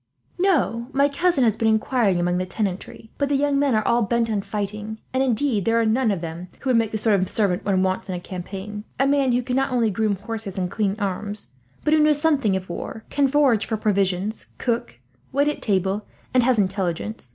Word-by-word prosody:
"No; 275 Hz, -11 st, +1 dB
my 280 Hz, +1 st, +4 dB
cousin 290 Hz, 0 st, +1 dB
has 220 Hz, -3 st, +3 dB
been 225 Hz, -, 0 dB
inquiring 220 Hz, -3 st, +2 dB
among 175 Hz, +1 st, +1 dB
the 185 Hz, -, -1 dB
tenantry, 205 Hz, +2 st, -4 dB
but 280 Hz, -1 st, +1 dB
the 285 Hz, -, +2 dB
young 280 Hz, 0 st, +2 dB
men 280 Hz, -4 st, +2 dB
are 215 Hz, -, +1 dB
all 235 Hz, +1 st, +3 dB
bent 230 Hz, +1 st, +1 dB
on 205 Hz, -2 st, 0 dB
fighting, 210 Hz, +2 st, -4 dB
and 260 Hz, -, +2 dB
indeed 250 Hz, -4 st, +1 dB
there 230 Hz, +3 st, +2 dB
are 230 Hz, -, +2 dB
none 225 Hz, +2 st, +2 dB
of 195 Hz, -5 st, -1 dB
them 170 Hz, +2 st, -6 dB
who 265 Hz, -, 0 dB
would 240 Hz, -, +4 dB
make 225 Hz, -1 st, +2 dB
the 220 Hz, -, -2 dB
sort 210 Hz, -2 st, +2 dB
of 185 Hz, -, -1 dB
servant 195 Hz, -5 st, 0 dB
one 190 Hz, -2 st, +2 dB
wants 190 Hz, +1 st, -1 dB
in 185 Hz, -, -2 dB
a -, -, -3 dB
campaign 195 Hz, +3 st, -7 dB, 0.2 s
a 270 Hz, -, +4 dB
man 275 Hz, -2 st, +3 dB
who 245 Hz, +1 st, +1 dB
can 250 Hz, +1 st, -2 dB
not 270 Hz, 0 st, +1 dB
only 235 Hz, -4 st, +2 dB
groom 215 Hz, 0 st, +1 dB
horses 210 Hz, 0 st, -6 dB
and 180 Hz, -1 st, -1 dB
clean 205 Hz, -2 st, 0 dB
arms, 205 Hz, 0 st, -4 dB, 0.3 s
but 305 Hz, -, +2 dB
who 315 Hz, -, +5 dB
knows 300 Hz, -1 st, +4 dB
something 280 Hz, -10 st, +2 dB
of 190 Hz, 0 st, -4 dB
war, 220 Hz, +5 st, -6 dB
can 285 Hz, -1 st, +3 dB
forage 270 Hz, -6 st, +3 dB
for 220 Hz, -, -1 dB
provisions, 200 Hz, 0 st, 0 dB
cook, 230 Hz, -, -2 dB, 0.3 s
wait 280 Hz, +2 st, +2 dB
on 295 Hz, -, 0 dB
table, 195 Hz, 0 st, 0 dB, 0.3 s
and 255 Hz, -, +5 dB
has 245 Hz, 0 st, +3 dB
intelligence. 190 Hz, -, -1 dB
220 Hz, 225 wpm, -23 LUFS, 195-260 Hz, 0.3 s, who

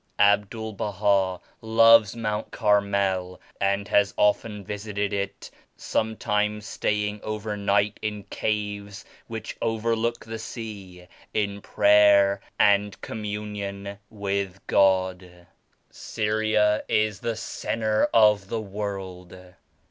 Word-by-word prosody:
Abdul 105 Hz, +2 st, +2 dB
Baha 100 Hz, -2 st, 0 dB, 0.2 s
loves 115 Hz, -1 st, +5 dB
Mount 110 Hz, -2 st, -3 dB
Carmel 100 Hz, -4 st, 0 dB, 0.2 s
and 100 Hz, +1 st, 0 dB
has 100 Hz, -1 st, +2 dB
often 105 Hz, 0 st, +1 dB
visited 105 Hz, 0 st, -3 dB
it, 100 Hz, 0 st, -4 dB, 0.3 s
some 110 Hz, 0 st, -2 dB
times 105 Hz, 0 st, -1 dB
staying 105 Hz, 0 st, -2 dB
over 110 Hz, 0 st, -4 dB
night 100 Hz, 0 st, +1 dB
in 105 Hz, -2 st, -4 dB
caves 105 Hz, -1 st, -4 dB, 0.2 s
which 110 Hz, -2 st, -6 dB
overlook 115 Hz, +1 st, -1 dB
the 110 Hz, 0 st, -6 dB
sea, 100 Hz, -6 st, -8 dB, 0.3 s
in 100 Hz, -1 st, -1 dB
prayer 100 Hz, -1 st, +4 dB, 0.2 s
and 100 Hz, 0 st, +3 dB
communion 100 Hz, -2 st, -5 dB
with 100 Hz, -2 st, -3 dB
God. 95 Hz, -2 st, +1 dB, 0.5 s
Syria 110 Hz, -1 st, 0 dB
is 105 Hz, -1 st, +1 dB
the 115 Hz, -1 st, -2 dB
centre 110 Hz, 0 st, -1 dB
of 105 Hz, -3 st, +4 dB
the 115 Hz, -, -2 dB
world. 95 Hz, -3 st, -6 dB
105 Hz, 100 wpm, -25 LUFS, 100-110 Hz, 0.5 s, loves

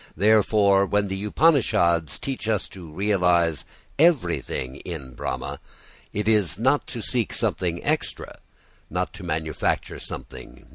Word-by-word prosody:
Therefore 100 Hz, -1 st, +4 dB
when 100 Hz, 0 st, +1 dB
the 95 Hz, +1 st, -4 dB
Upanishads 95 Hz, -, +3 dB
teach 135 Hz, -5 st, -5 dB
us 110 Hz, -2 st, 0 dB
to 85 Hz, -5 st, -11 dB
realise 90 Hz, -4 st, +2 dB, 0.3 s
everything 90 Hz, -, +1 dB
in 70 Hz, -8 st, -7 dB
Brahma, -, -, -4 dB, 0.5 s
it 105 Hz, +1 st, -2 dB
is 105 Hz, -5 st, +2 dB
not 135 Hz, +6 st, +2 dB
to 115 Hz, -3 st, -6 dB
seek 120 Hz, -5 st, 0 dB
something 85 Hz, -2 st, -1 dB
extra, -, -, -2 dB, 0.5 s
not -, -, -2 dB
to -, -, -10 dB
manufacture 80 Hz, -2 st, -2 dB
something -, -, -8 dB
new. 60 Hz, -, -19 dB
95 Hz, 130 wpm, -24 LUFS, 85-110 Hz, 0.5 s, Therefore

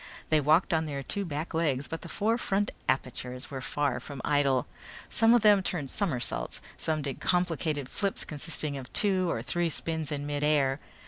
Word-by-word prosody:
They 155 Hz, -1 st, +4 dB
walked 155 Hz, +5 st, +4 dB
on 160 Hz, 0 st, +1 dB
their 140 Hz, -2 st, -4 dB
two 200 Hz, +7 st, -3 dB
back 155 Hz, 0 st, -4 dB
legs 145 Hz, -5 st, 0 dB
but 165 Hz, -, -5 dB
the -, -, -9 dB
four 225 Hz, +3 st, +1 dB
front 205 Hz, -2 st, 0 dB, 0.2 s
apertures 130 Hz, 0 st, -2 dB
were 135 Hz, -1 st, -4 dB
far 140 Hz, -2 st, 0 dB
from 140 Hz, +2 st, -8 dB
idle. 140 Hz, -3 st, +3 dB, 0.4 s
Some 225 Hz, +1 st, +5 dB
of 235 Hz, -, +3 dB
them 205 Hz, -2 st, +7 dB
turned 155 Hz, -7 st, -2 dB
somersaults, 125 Hz, -, -1 dB, 0.3 s
others 155 Hz, -2 st, +1 dB
did 140 Hz, -2 st, -4 dB
complicated 165 Hz, -6 st, 0 dB
flips 195 Hz, +8 st, -2 dB
consisting 150 Hz, -1 st, -1 dB
of 130 Hz, -2 st, -8 dB
two 190 Hz, -4 st, +3 dB
or -, -, -1 dB
three 175 Hz, -1 st, 0 dB
spins 160 Hz, -1 st, -2 dB
in 145 Hz, -1 st, -2 dB
mid 145 Hz, 0 st, -2 dB
air. 145 Hz, -2 st, +3 dB
150 Hz, 185 wpm, -29 LUFS, 140-175 Hz, 0.4 s, them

